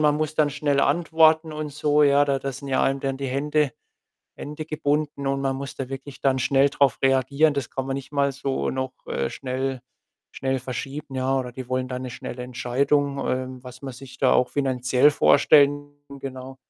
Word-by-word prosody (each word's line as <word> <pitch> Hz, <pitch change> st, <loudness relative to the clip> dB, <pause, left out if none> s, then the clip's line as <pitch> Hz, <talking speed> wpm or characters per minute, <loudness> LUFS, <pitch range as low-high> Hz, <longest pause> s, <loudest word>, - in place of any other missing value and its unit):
man 150 Hz, -1 st, +3 dB
muss 155 Hz, 0 st, -2 dB
dann 150 Hz, -2 st, +2 dB
schnell 145 Hz, -1 st, +1 dB
antworten 160 Hz, +1 st, +3 dB
und 155 Hz, -1 st, -4 dB
so, 150 Hz, +1 st, +2 dB
ja? 145 Hz, 0 st, +5 dB
Da 140 Hz, -1 st, 0 dB
da 135 Hz, +1 st, -4 dB
sind 140 Hz, +2 st, -8 dB
ja 130 Hz, -, +1 dB
einem 135 Hz, 0 st, +1 dB
dann 135 Hz, 0 st, -2 dB
die 135 Hz, 0 st, -4 dB
Hände 145 Hz, +1 st, 0 dB, 0.6 s
Hände 150 Hz, +2 st, -7 dB
gebunden 150 Hz, -2 st, -1 dB
und 135 Hz, 0 st, 0 dB
man 135 Hz, -1 st, 0 dB
muss 140 Hz, +1 st, -6 dB
da 135 Hz, -1 st, -5 dB
wirklich 135 Hz, 0 st, -8 dB
dann 135 Hz, -1 st, +2 dB
schnell 135 Hz, +2 st, +3 dB
drauf 140 Hz, -2 st, +2 dB
reagieren. 140 Hz, +3 st, +3 dB
Das 140 Hz, -4 st, -3 dB
kann 135 Hz, 0 st, -4 dB
man 135 Hz, -, -1 dB
nicht 140 Hz, +1 st, -7 dB
mal 140 Hz, -1 st, +1 dB
so 135 Hz, 0 st, -2 dB
noch, 130 Hz, 0 st, -3 dB
äh, 65 Hz, 0 st, -2 dB
schnell 130 Hz, -1 st, -3 dB, 0.5 s
schnell 135 Hz, 0 st, -2 dB
verschieben, 135 Hz, +3 st, -6 dB
ja, 130 Hz, +1 st, +1 dB
oder 125 Hz, -1 st, -5 dB
die 125 Hz, 0 st, -8 dB
wollen 130 Hz, 0 st, -1 dB
dann 125 Hz, 0 st, -5 dB
'ne 130 Hz, -, -5 dB
schnelle 125 Hz, 0 st, -7 dB
Entscheidung, 140 Hz, +3 st, 0 dB
ähm, 130 Hz, 0 st, -3 dB
was 125 Hz, 0 st, -11 dB
man 135 Hz, -2 st, -6 dB
sich 130 Hz, 0 st, -12 dB
da -, -, +3 dB
auch 125 Hz, -, +3 dB
finanziell 130 Hz, -1 st, +2 dB
vorstellen, 145 Hz, 0 st, +4 dB, 0.3 s
genau. 130 Hz, 0 st, -7 dB
135 Hz, 200 wpm, -24 LUFS, 130-145 Hz, 0.6 s, ja